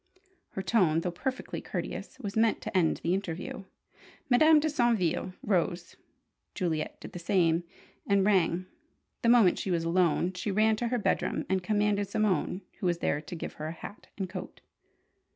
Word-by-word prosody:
Her 190 Hz, -, -3 dB
tone, 175 Hz, -9 st, +3 dB
though 180 Hz, -, -2 dB
perfectly 260 Hz, +9 st, -4 dB
courteous, -, -, -5 dB
was 200 Hz, -2 st, -5 dB
meant 225 Hz, 0 st, +3 dB
to -, -, -6 dB
end 170 Hz, -4 st, +2 dB
the 170 Hz, -, +1 dB
interview. 185 Hz, 0 st, -4 dB, 0.7 s
Madame 310 Hz, +5 st, +7 dB
de 305 Hz, -, 0 dB
Saintville 235 Hz, -, +1 dB
rose. 180 Hz, -2 st, -1 dB, 0.6 s
Juliet 160 Hz, -5 st, -2 dB
did -, -, -9 dB
the 175 Hz, -, -7 dB
same, 170 Hz, -2 st, +2 dB, 0.4 s
and 200 Hz, -1 st, +3 dB
rang. 185 Hz, -3 st, +2 dB, 0.6 s
The 230 Hz, -, +3 dB
moment 230 Hz, -7 st, +5 dB
she -, -, -3 dB
was 170 Hz, -2 st, +1 dB
alone, 175 Hz, +1 st, +2 dB
she 180 Hz, +3 st, -4 dB
ran 215 Hz, +2 st, +3 dB
to 240 Hz, -, -1 dB
her 245 Hz, +1 st, 0 dB
bedroom 220 Hz, -, 0 dB
and 190 Hz, 0 st, +1 dB
commanded 205 Hz, +1 st, +1 dB
Simone, 195 Hz, -3 st, 0 dB, 0.2 s
who 185 Hz, -, 0 dB
was 175 Hz, -1 st, +1 dB
there, 150 Hz, -3 st, 0 dB
to 155 Hz, +3 st, -8 dB
give 165 Hz, -, -6 dB
her 155 Hz, -, -2 dB
a -, -, -3 dB
hat 185 Hz, +5 st, -10 dB
and 190 Hz, -2 st, -2 dB
coat. -, -, -8 dB
190 Hz, 170 wpm, -29 LUFS, 175-215 Hz, 0.7 s, Madame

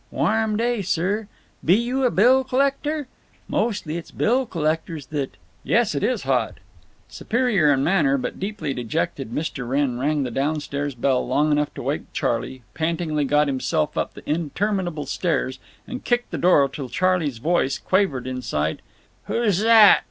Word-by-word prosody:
Warm 220 Hz, -1 st, +1 dB
day, 235 Hz, -1 st, 0 dB
sir. 195 Hz, +4 st, -1 dB, 0.4 s
Be 175 Hz, -, +5 dB
you 250 Hz, +4 st, 0 dB
a -, -, +4 dB
bill 250 Hz, +6 st, +4 dB
collector? 275 Hz, +3 st, 0 dB, 0.4 s
Mostly, 195 Hz, -8 st, -1 dB
it's 170 Hz, -, -8 dB
bill 250 Hz, +3 st, +1 dB
collectors 160 Hz, -3 st, -2 dB
that—" 140 Hz, -2 st, -4 dB, 0.3 s
"Yes, -, -, +2 dB
it -, -, -2 dB
is -, -, 0 dB
hot." -, -, 0 dB, 0.5 s
Superior 220 Hz, -, +1 dB
in 135 Hz, -1 st, +2 dB
manner, 150 Hz, -6 st, +3 dB
but 125 Hz, -, -4 dB
deeply 190 Hz, -7 st, -3 dB
dejected, 135 Hz, +2 st, -3 dB
Mr. 135 Hz, -2 st, -4 dB
Wrenn 135 Hz, -2 st, 0 dB
rang 145 Hz, +2 st, +1 dB
the 125 Hz, -, -3 dB
down 145 Hz, +5 st, 0 dB
stairs 145 Hz, -1 st, -4 dB
bell 130 Hz, +1 st, +1 dB
long 150 Hz, +1 st, +2 dB
enough 150 Hz, 0 st, +1 dB
to -, -, -6 dB
wake -, -, -3 dB
Charley, 130 Hz, -2 st, -2 dB
pantingly 160 Hz, -2 st, -1 dB
got 150 Hz, +2 st, +3 dB
himself 130 Hz, -, -1 dB
up -, -, -2 dB
the -, -, -13 dB
interminable 170 Hz, 0 st, -1 dB
stairs, 135 Hz, -3 st, -1 dB, 0.3 s
and 250 Hz, +1 st, -7 dB
kicked 240 Hz, 0 st, 0 dB
the -, -, -3 dB
door 170 Hz, -6 st, +5 dB
till 135 Hz, -1 st, -7 dB
Charley's 180 Hz, -6 st, +1 dB
voice 140 Hz, 0 st, +1 dB
quavered 185 Hz, -8 st, 0 dB
inside: 100 Hz, -13 st, -2 dB, 0.4 s
"Who 235 Hz, -3 st, +1 dB
zhat?" 215 Hz, +2 st, +7 dB
160 Hz, 160 wpm, -23 LUFS, 140-210 Hz, 0.5 s, zhat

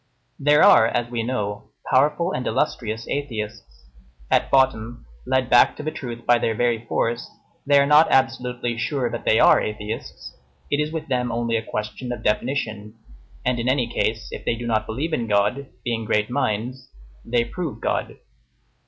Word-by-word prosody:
There 150 Hz, +2 st, +4 dB
are, 110 Hz, -, +7 dB
as 120 Hz, 0 st, -2 dB
we 120 Hz, -1 st, -1 dB
know, 105 Hz, -4 st, -3 dB, 0.2 s
powerful 150 Hz, +6 st, +3 dB
and 125 Hz, -, -3 dB
illustrious 110 Hz, -1 st, -2 dB
atheists. 110 Hz, -, -5 dB, 0.5 s
At -, -, +3 dB
bottom, 120 Hz, -, +1 dB, 0.2 s
led 130 Hz, -1 st, +1 dB
back 120 Hz, -1 st, +5 dB
to -, -, -7 dB
the 155 Hz, -, -2 dB
truth 120 Hz, -5 st, -7 dB
by 120 Hz, -1 st, +4 dB
their 115 Hz, -, 0 dB
very 120 Hz, 0 st, 0 dB
force, 115 Hz, +1 st, -1 dB, 0.4 s
they 145 Hz, 0 st, +5 dB
are 140 Hz, -, +4 dB
not 150 Hz, +2 st, +5 dB
absolutely 125 Hz, -3 st, 0 dB
sure 125 Hz, 0 st, -1 dB
that -, -, -6 dB
they 110 Hz, -, +4 dB
are -, -, +6 dB
atheists; 105 Hz, 0 st, -6 dB, 0.4 s
it 145 Hz, -, +2 dB
is 150 Hz, +1 st, -1 dB
with 160 Hz, -1 st, -4 dB
them 125 Hz, -3 st, -1 dB
only 115 Hz, 0 st, -1 dB
a 115 Hz, -, +1 dB
question 110 Hz, +3 st, -5 dB
of 120 Hz, -, -6 dB
definition, 110 Hz, -2 st, -2 dB, 0.5 s
and 125 Hz, -1 st, +1 dB
in 120 Hz, +2 st, 0 dB
any 130 Hz, -2 st, +2 dB
case, 110 Hz, -1 st, -1 dB
if -, -, -7 dB
they -, -, 0 dB
do 120 Hz, +1 st, -6 dB
not 110 Hz, -2 st, 0 dB
believe 145 Hz, +9 st, -3 dB
in 120 Hz, -6 st, -1 dB
God, 105 Hz, +7 st, +1 dB, 0.2 s
being 115 Hz, -2 st, -2 dB
great 105 Hz, +2 st, 0 dB
minds, 125 Hz, +3 st, -2 dB, 0.3 s
they 120 Hz, 0 st, +1 dB
prove 160 Hz, +4 st, -5 dB
God. -, -, -2 dB
120 Hz, 175 wpm, -23 LUFS, 110-130 Hz, 0.5 s, are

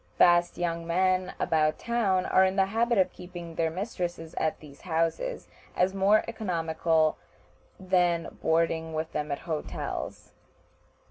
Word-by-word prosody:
Fast 175 Hz, 0 st, +4 dB
young 170 Hz, -1 st, -2 dB
men 185 Hz, +1 st, +1 dB
about 155 Hz, -1 st, +2 dB
town 205 Hz, -6 st, +1 dB
are 190 Hz, -, +4 dB
in 190 Hz, 0 st, +2 dB
the 195 Hz, -1 st, +4 dB
habit 230 Hz, +3 st, +1 dB
of 185 Hz, -1 st, +2 dB
keeping 175 Hz, -2 st, -9 dB
their 165 Hz, 0 st, 0 dB
mistresses 175 Hz, -3 st, -4 dB
at 155 Hz, -, -1 dB
these 145 Hz, -2 st, -14 dB
houses, 170 Hz, -, -1 dB, 0.3 s
as 185 Hz, +1 st, +2 dB
more 195 Hz, +2 st, +4 dB
economical 165 Hz, -7 st, 0 dB, 0.6 s
than 180 Hz, -3 st, +1 dB
boarding 160 Hz, 0 st, +1 dB
with 160 Hz, +1 st, -3 dB
them 150 Hz, 0 st, -3 dB
at 140 Hz, -, -1 dB
hotels. 160 Hz, -3 st, -5 dB
175 Hz, 135 wpm, -28 LUFS, 160-190 Hz, 0.6 s, Fast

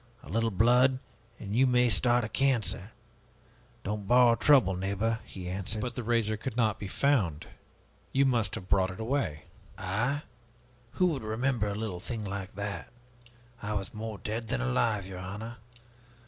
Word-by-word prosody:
A -, -, -12 dB
little 115 Hz, +5 st, +1 dB
blood, 125 Hz, +6 st, +4 dB, 0.4 s
and 100 Hz, 0 st, -4 dB
you 130 Hz, +2 st, +5 dB
may 125 Hz, 0 st, +4 dB
start 120 Hz, +5 st, +3 dB
a -, -, -1 dB
cancer!' 115 Hz, -5 st, 0 dB, 0.9 s
'Don't 105 Hz, 0 st, -3 dB
borrow 125 Hz, -1 st, +6 dB
trouble, 125 Hz, -6 st, +5 dB
neighbor,' 100 Hz, +4 st, -1 dB
he 90 Hz, -2 st, -8 dB
answered." 95 Hz, +4 st, -3 dB
"But 120 Hz, +3 st, -3 dB
the 125 Hz, -, -4 dB
razor 115 Hz, -2 st, +1 dB
could 120 Hz, +2 st, -5 dB
not 110 Hz, -3 st, +2 dB
be 100 Hz, -, -5 dB
found. 95 Hz, -, +1 dB, 0.7 s
You 140 Hz, +1 st, +3 dB
must 115 Hz, -7 st, +1 dB
have 90 Hz, -, -7 dB
brought 95 Hz, -1 st, +3 dB
it 95 Hz, -, -8 dB
away." 110 Hz, -, -1 dB, 0.3 s
"I? 115 Hz, +10 st, -1 dB, 0.7 s
Who 185 Hz, -, +2 dB
would 135 Hz, -, -4 dB
remember 110 Hz, +1 st, 0 dB
a 100 Hz, -, -2 dB
little 105 Hz, -4 st, -3 dB
thing 110 Hz, +3 st, -5 dB
like 100 Hz, 0 st, -5 dB
that? 100 Hz, 0 st, -4 dB, 0.7 s
I 105 Hz, +1 st, -3 dB
was 100 Hz, -2 st, -3 dB
more 110 Hz, -1 st, -5 dB
dead 110 Hz, +4 st, -4 dB
than 65 Hz, -, -1 dB
alive, 100 Hz, -, +1 dB
your 95 Hz, -1 st, -7 dB
honor. 105 Hz, +5 st, -6 dB
110 Hz, 165 wpm, -30 LUFS, 100-120 Hz, 0.9 s, borrow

